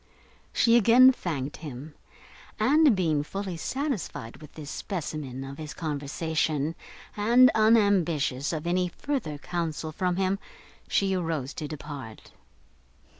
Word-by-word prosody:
She 230 0 +4
again 240 +4 +7
thanked 150 - -4
him; 145 0 -8 0.7
and, 290 -2 +5
being 160 -6 +1
fully 190 +4 -5
satisfied 200 - -4
with 150 0 -14
this 150 -2 -8
specimen 150 -8 -5
of 135 +2 -8
his 155 -1 -7
conversation, 155 0 -1 0.4
and 240 +5 +6
unambitious 185 - +3
of 160 -1 -4
any 180 +1 +1
further 175 - -3
counsel 160 0 -3
from 180 +3 -1
him, 190 +1 0 0.5
she 195 -1 +1
arose 160 -7 -2
to 150 - -5
depart. 140 -6 -8
165 Hz, 120 wpm, -27 LUFS, 150-200 Hz, 0.7 s, again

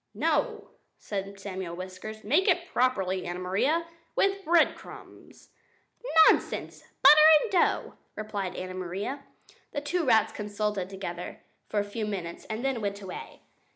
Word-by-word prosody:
"No," - - -1 0.3
said 195 -1 -5
Samuel 190 -3 -5
Whiskers, 185 +4 -8
"make 305 - +2
it 355 -2 +2
properly, 190 -7 +1
Anna 175 0 -4
Maria, 200 - 0 0.3
with 395 0 +1
breadcrumbs." 340 -1 -1 0.8
"Nonsense! - - 0 0.2
Butter 300 - +9 0.2
and 445 - -4
dough," 365 - +1 0.2
replied 205 -3 -4
Anna 185 0 -5
Maria. 185 +10 -4 0.5
The 285 - -2
two 335 +4 -1
rats 225 -6 +4
consulted 210 -2 -3
together 180 -3 -6 0.3
for 210 - 0
a - - +1
few 210 +1 -4
minutes 180 -5 -5
and 220 +4 -4
then 265 -4 -1
went 200 -1 -3
away. 190 -2 -9
205 Hz, 135 wpm, -28 LUFS, 185-275 Hz, 0.8 s, Butter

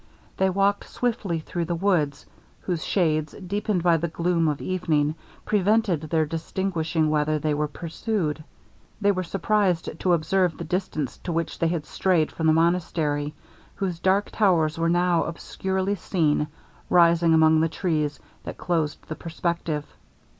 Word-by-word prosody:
They 190 0 +3
walked 200 +2 +1
swiftly 215 -8 -1
through 170 +2 -3
the 170 +1 -2
woods, 165 -7 0 0.4
whose 175 -4 -2
shades, 155 -5 +1
deepened 200 -1 -2
by 170 -2 +4
the 170 +2 -1
gloom 170 0 0
of 150 -2 0
evening, 160 -5 0 0.3
prevented 205 -4 +2
their 160 0 0
distinguishing 165 -1 -1
whether 155 0 +1
they 150 0 0
were 150 +1 0
pursued. 165 0 -3 0.6
They 205 -1 +3
were 185 -2 -1
surprized 185 -3 0
to 180 - +2
observe 175 +1 +1
the - - -5
distance 165 -5 -3
to 175 - -5
which 165 0 -2
they 165 - +2
had 165 -3 -2
strayed 175 -3 +1
from 160 - -1
the 155 - +5
monastery, 160 -3 0 0.4
whose 185 -4 -3
dark 190 +3 +2
towers 170 -7 +2
were 165 0 +2
now 175 0 +2
obscurely 190 +3 -2
seen 155 -7 0 0.4
rising 170 -1 +5
among 160 0 +5
the 165 - +2
trees 155 -4 -1 0.2
that - - -7
closed 160 -4 -2
the 155 - -5
perspective. 165 -2 -3
170 Hz, 150 wpm, -25 LUFS, 155-185 Hz, 0.6 s, the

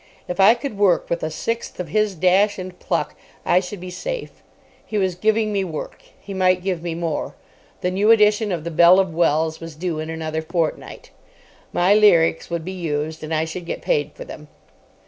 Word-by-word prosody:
If 180 - -5
I 205 +4 +7
could 240 -4 -6
work 190 -4 +2
with 170 - 0
a 155 - -2
sixth 230 +9 -4
of 180 -3 -4
his 215 +2 +1
dash 190 +4 +3
and 185 -1 -8
pluck, - - -2 0.3
I 180 - +4
should 185 +1 -7
be 180 0 -8
safe. - - -6 0.4
He 215 - -4
was 190 -2 +1
giving 215 +3 +1
me 200 -1 +1
work. 160 -5 -6 0.2
He 200 - -9
might 185 -1 +2
give 185 -3 -2
me 170 -1 -4
more. 165 -2 -3 0.5
The 180 - 0
new 200 +4 +1
edition 210 -1 +4
of 170 -4 -3
the 170 - -4
Belle 170 +3 +6
of 190 -4 0
Wells 160 -1 +1
was 165 -2 -9
due 165 -1 -3
in 155 0 -5
another 160 -1 -3
fortnight. 165 0 -3 0.6
My 180 +3 +3
lyrics 170 -7 +4
would 170 -2 -3
be 185 - -4
used, 160 -3 -3
and 155 - -6
I 160 0 +1
should 170 +2 -7
get - - -5
paid 145 0 0
for - - -9
them. 150 - -10
180 Hz, 205 wpm, -21 LUFS, 160-200 Hz, 0.6 s, I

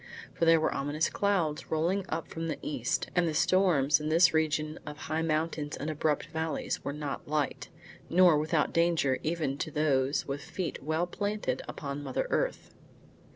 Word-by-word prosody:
For 165 - 0
there 165 0 +6
were 155 - +1
ominous 145 +3 -1
clouds 175 -6 0
rolling 180 +5 0
up 160 +1 -3
from 165 0 -5
the 155 - -2
east, 125 -5 -2
and 175 -1 +3
the 155 - -2
storms 155 -6 +3
in 150 0 -3
this 170 +1 +5
region 155 -1 0
of 150 0 -8
high 155 +1 -2
mountains 155 -2 -1
and 155 +2 -3
abrupt 150 -1 0
valleys 160 0 -2
were - - -2
not 145 -1 -5
light, 145 -3 -1 0.4
nor 175 -1 +6
without 155 0 +1
danger 165 -6 +2
even 155 -4 -2
to 165 - -2
those 140 -2 +1
with 140 +1 -3
feet 180 -1 -4
well 160 +4 0
planted 205 -8 -2
upon 140 0 -5
mother 135 -3 -2
earth. - - -1
155 Hz, 170 wpm, -30 LUFS, 145-165 Hz, 0.4 s, there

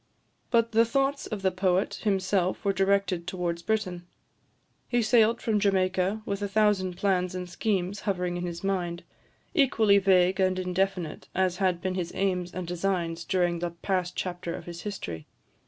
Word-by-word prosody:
But 230 -1 +3
the 225 +1 +5
thoughts 275 +4 0
of 205 -3 -5
the 190 - +3
poet 185 0 0
himself 190 -2 0
were 200 - +3
directed 195 -3 +1
towards 175 -2 -2
Britain. 180 -3 -2 0.8
He 240 -1 +2
sailed 225 +1 +4
from 215 -2 +2
Jamaica, 190 +1 +1
with 200 0 -3
a 205 - 0
thousand 200 -3 +1
plans 185 -2 +1
and 180 0 -4
schemes 190 +1 -1
hovering 180 -3 -1
in 175 - -3
his 170 0 -5
mind, 180 -3 -2 0.5
equally 225 - +4
vague 190 -1 +3
and 185 -1 +2
indefinite 185 -2 -2
as 185 -1 +1
had 185 -3 +1
been 185 -1 -1
his 180 -2 -3
aims 180 -2 0
and 185 0 -5
designs 175 -1 -2
during 175 -2 +1
the 175 0 -2
past 180 +1 -2
chapter 175 -2 -3
of - - -9
his 170 -1 -7
history. 90 - -6
185 Hz, 165 wpm, -27 LUFS, 175-200 Hz, 0.8 s, the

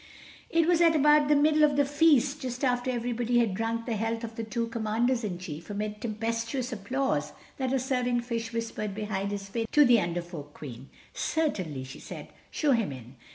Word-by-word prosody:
It 330 -1 +3
was 345 -1 +4
at 330 -1 +5
about 300 0 +5
the 295 - +4
middle 305 +1 +4
of 295 -1 +4
the 285 0 +3
feast, 290 -1 +3
just 255 +1 -2
after 245 0 +1
everybody 240 -1 0
had 230 -5 +3
drunk 225 +3 -2
the 235 - -1
health 225 +2 -2
of 225 0 -5
the 225 - -5
two 230 +1 -2
Commanders 230 +2 0
in 190 -5 -3
Chief, 165 -2 -8
amid 210 +1 -4
tempestuous 230 +3 -2
applause, 260 +6 -1 0.2
that 260 -1 -1
a 270 - +2
serving 250 -2 0
fish 230 -1 -4
whispered 225 -3 -3
behind 205 -2 -2
his 200 -1 -4
fin 225 +3 -3
to 295 -1 +6
the 240 -4 +5
Under 175 0 -2
Folk 150 -4 -9
Queen: 130 -2 -9 0.2
"Certainly," 185 - -1
she 130 +1 -10
said, - - -9 0.2
"show 300 -3 +1
him 230 - +2
in." 125 0 -10
230 Hz, 200 wpm, -28 LUFS, 205-265 Hz, 0.2 s, to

